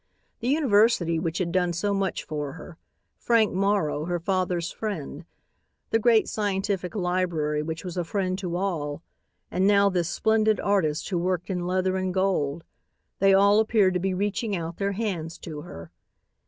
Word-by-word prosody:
The 235 - -4
university 215 - +3
which 165 0 -2
had 175 -2 -1
done 180 -1 +1
so 200 +4 -1
much 195 -2 -1
for 150 -3 -4
her, 165 0 -11 0.4
Frank 230 -3 +3
Morrow, 190 -6 0
her 175 0 -1
father's 180 -1 -1
friend, 175 -7 -5 0.7
the 225 - +3
great 225 -1 +4
scientific 195 -2 -2
library 175 -5 0
which 160 +3 -5
was 180 0 -6
a 175 - 0
friend 185 +1 -1
to 180 -3 -3
all, 165 -5 -2 0.5
and 185 +2 +2
now 200 -1 +4
this 175 -2 0
splendid 220 +1 +2
artist 170 -7 0
who 180 -4 0
worked 180 +1 -1
in 180 -1 -2
leather 185 +1 0
and 185 0 -2
gold; 170 -5 0 0.6
they 195 0 +5
all 200 +2 +5
appeared 215 -4 +3
to 180 - 0
be 190 +1 -1
reaching 205 +2 -1
out 170 -1 -5
their 200 0 -1
hands 185 -6 -3
to 155 -3 -7
her. 85 - -10
185 Hz, 170 wpm, -26 LUFS, 170-200 Hz, 0.7 s, they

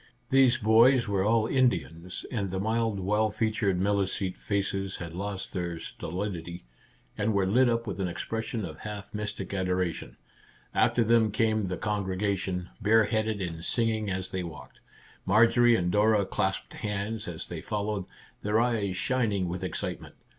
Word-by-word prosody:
These 130 -2 +5
boys 115 +3 +5
were 100 -2 +1
all 110 +1 +3
Indians, 90 - 0
and 100 -6 -1
the 95 +1 -3
mild 110 0 0
well 105 +3 +1
featured 105 -4 0
Milicete 95 -1 0
faces 95 -1 -2
had 85 -2 -7
lost 100 +1 -4
their 85 -2 -3
stolidity, 85 0 -5 0.5
and 105 +1 +1
were 100 -1 +3
lit 120 +6 +4
up 115 0 0
with 100 -4 -5
an 95 - 0
expression 110 +4 -3
of 80 -2 -8
half 105 -2 -7
mystic 105 0 -4
adora 90 -2 0
tion. - - -10 0.6
After 120 - +3
them 115 -1 +4
came 110 -1 +1
the 90 - -3
congregation, 95 -3 -2
bare 110 +1 +5
headed, 110 -2 -1
and 85 -2 -5
singing 110 0 +1
as 95 0 -2
they 95 -2 -2
walked. 85 -3 -9 0.5
Marjorie 120 +2 +5
and 90 -4 0
Dora 105 0 +3
clasped 95 0 -2
hands 105 +1 -3
as 85 -2 -5
they - - -6
followed, 105 -2 -2 0.4
their 105 +2 +2
eyes 110 -6 0
shining 105 -8 0
with 90 +2 -4
excitement. 95 - -4
100 Hz, 155 wpm, -28 LUFS, 95-110 Hz, 0.6 s, These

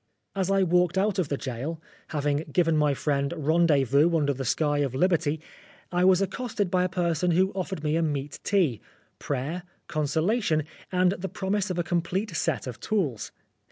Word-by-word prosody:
As 190 -1 0
I 195 0 +3
walked 180 0 +2
out 200 0 +1
of 175 - 0
the 140 - -1
gaol,* 135 +6 -4 0.3
having 145 -1 0
given 165 0 +2
my 150 -2 +2
friend 140 0 0
rendezvous 155 0 +3
under 145 -2 +1
the 135 0 -5
sky 145 +3 +1
of 135 -3 -1
Liberty, 160 -1 +1 0.5
I 180 0 +2
was 190 0 +5
accosted 205 -2 -2
by 180 -1 +3
a 185 - 0
person 175 -1 0
who 185 +3 +3
offered 190 -4 -4
me 150 0 +1
a 165 - +2
meat 145 -3 -2
tea, 175 - +1 0.4
prayer, 145 +6 -3 0.3
consol 155 +6 0
ation, 160 -10 +1 0.3
and 180 -1 +3
the 190 0 -4
promise 200 +1 -1
of 180 - -2
a 175 - +1
complete 175 +3 -1
set - - -1
of 125 -2 -7
tools. 160 - -1
165 Hz, 180 wpm, -26 LUFS, 145-185 Hz, 0.5 s, was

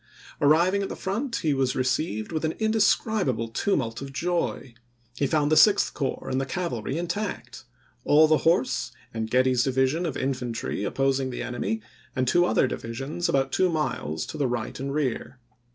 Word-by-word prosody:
Arriving 170 +7 +4
at 195 - -3
the - - -5
front 225 +7 -3
he 155 -3 +1
was 135 -2 0
received 130 -4 -1
Report?' - - -7
with - - -1
an - - -12
indescribable 215 - +1
tumult 115 - -1
of 135 0 -6
joy; 170 -4 -2 0.4
he 140 +2 0
found 150 +1 +1
the - - +5
Sixth 205 +4 +5
Corps 135 -3 -3
and 130 0 0
the - - -2
cavalry 135 -5 -3
intact; 170 - -4 0.4
all 155 +2 +6
the 155 0 +4
horse 130 -7 +1 0.2
and 110 -1 -3
Getty's 125 0 +3
division 135 +6 +1
of 150 - -3
infantry 125 -6 -3
opposing 135 +3 0
the 125 - -4
enemy 125 - -3 0.3
and 130 -1 0
two 175 +6 +4
other - - +3
divisions 135 +8 -3
about 135 -1 +1
two 185 +5 +2
miles 80 - -2
to 155 - -7
the 140 - +2
right 120 -2 -3
and 135 +1 -3
rear. 135 -3 -2
135 Hz, 175 wpm, -26 LUFS, 125-170 Hz, 0.4 s, all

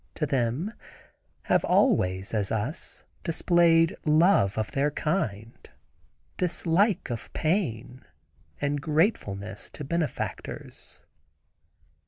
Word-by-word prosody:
to 155 - 0
them, 135 - -1 0.7
have - - +2
always, 95 +2 +2
as 105 -3 0
us, 110 - -3 0.2
displayed 170 0 +3
love 155 - +4
to 110 - +1
their 140 +1 +1
kind, 115 - -3 0.7
dislike 180 - +1
of 115 - -5
pain, 130 - -1 0.6
and 145 0 -1
gratefulness 145 - 0
to 150 - -8
benefactors. 160 0 -4
150 Hz, 90 wpm, -27 LUFS, 115-170 Hz, 0.7 s, love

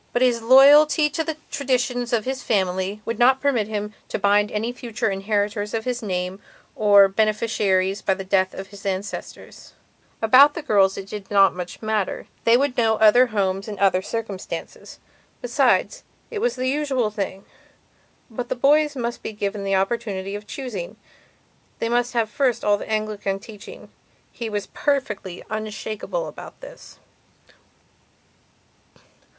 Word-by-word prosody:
But 245 - +2
his 240 -2 +2
loyalty 290 +5 +6
to 320 - -1
the 320 -1 -4
traditions 250 -3 -1
of 230 -3 0
his 260 0 -3
family 190 0 -1
would 230 -1 -4
not 260 +2 +5
permit 255 -7 +1
him 210 -1 -4
to - - -3
bind 205 +1 +2
any 220 +3 -2
future 230 -4 -3
inheritors 205 +1 -2
of 220 - -3
his 250 -1 -2
name 185 -1 -3 0.3
or 205 -2 +6
beneficiaries 200 -2 0
by 190 - +1
the 195 - -6
death 190 0 +1
of 190 0 -8
his 200 -1 -13
ancestors. 195 +1 -6 0.5
About 265 +6 +6
the 335 - -5
girls 195 -7 +3
it 195 - -6
did 200 -1 -8
not 195 -1 +5
so - - -17
much 180 +4 -7
matter. 215 -3 -2 0.2
They 230 +1 +6
would 275 -1 -1
know 225 -2 +3
other 220 +4 +5
homes 195 -2 -1
and 210 -2 -6
other 190 -1 +3
circumstances. 205 -2 -6 0.4
Besides, - - +1 0.3
it 440 - -3
was 480 +3 0
the 255 0 -2
usual 265 -5 0
thing. 195 -2 -5 0.8
But 240 +1 -6
the - - -1
boys 295 +3 +3
must 240 -2 -4
be - - -6
given 205 -1 -3
the 195 0 0
opportunity 195 -1 -2
of 205 0 -7
choosingand 215 -8 -6 0.8
they 230 - -2
must 245 +1 0
have 230 -2 +1
first 250 +2 0
of - - 0
all 205 - +4
the - - -8
Anglican 215 -2 -2
teaching. 205 0 -12 0.4
He 235 -2 -5
was 205 -2 -3
perfectly 210 -11 -3
unshakable 215 - -4
about - - -11
this. - - -13
215 Hz, 155 wpm, -22 LUFS, 200-250 Hz, 0.8 s, loyalty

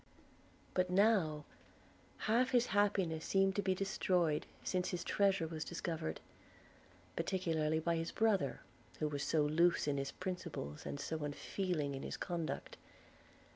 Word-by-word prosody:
But 185 0 +2
now 180 -7 +3 0.8
half 240 +4 +3
his 245 -2 +4
happiness 195 -6 +2
seemed 195 0 +2
to - - +3
be 190 -1 +1
destroyed, 180 -4 +1 0.2
since 180 -1 0
his 175 -1 -3
treasure 195 -4 +2
was 160 -1 -4
discovered, 160 - -3 0.9
particularly 160 -5 0
by 170 +1 +1
his 165 0 -2
brother, 205 -10 +1 0.4
who 155 - 0
was 145 -2 -3
so 155 0 +2
loose 165 +3 +3
in 145 -1 +1
his 135 0 -2
principles, 170 - -5
and 140 - -4
so 155 +1 -3
unfeeling 150 0 -2
in 135 - -4
his - - -4
conduct. 170 -3 -3
170 Hz, 135 wpm, -36 LUFS, 155-195 Hz, 0.9 s, his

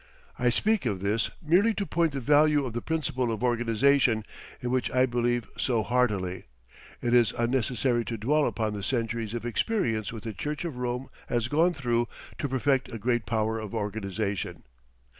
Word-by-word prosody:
I 125 - +3
speak 210 - +2
of 100 -4 -2
this 105 +3 +1
merely 190 +8 +4
to 200 - -1
point 165 -4 +1
the 135 - -2
value 145 +2 +4
of 120 - -5
the 120 - -2
principle 130 -6 -1
of 110 +1 -3
organization, 120 0 +3 0.3
in 125 - -3
which 130 -1 +1
I 130 0 +3
believe 120 -1 0
so 115 -4 +1
heartily. 105 -7 0 0.6
It 120 - +1
is 120 -3 +5
unnecessary 120 0 +1
to 115 - -3
dwell 145 +7 +2
upon 110 -2 -1
the 100 - -4
centuries 115 0 -2
of 120 - -4
experience 120 - 0
which 110 -2 -8
the 110 - -4
Church 150 - -4
of 155 -7 -4
Rome 125 +1 -2 0.2
has 120 -1 0
gone 165 +5 +3
through 120 -5 0 0.3
to 145 - -1
perfect 135 0 +1
a 115 - -4
great 120 -1 0
power 110 -1 0
of 110 -2 -6
organization. 100 -1 -3
120 Hz, 180 wpm, -28 LUFS, 110-135 Hz, 0.6 s, is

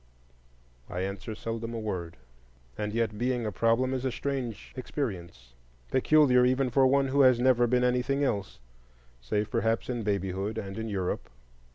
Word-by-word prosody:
I 90 - -3
answer 100 +3 -4
seldom 115 +1 -4
a - - -3
word. 90 -7 -4 0.6
And 105 0 -3
yet, 110 -1 -1
being 125 -1 0
a 105 - -1
problem 115 +6 +2
is 130 -1 -2
a 130 - 0
strange 130 -5 -4
experience,—peculiar 95 - 0
even 130 0 +2
for 135 0 +5
one 135 0 +2
who 140 +2 +3
has 130 -3 +6
never 120 -1 +4
been 125 +1 +2
anything 125 +3 +1
else, 100 - -2 0.6
save 105 - -2
perhaps 115 -1 0
in 120 -2 -3
babyhood 100 0 -2
and 100 -1 -5
in 110 0 -4
Europe. 95 -3 -3
115 Hz, 155 wpm, -28 LUFS, 100-130 Hz, 0.6 s, has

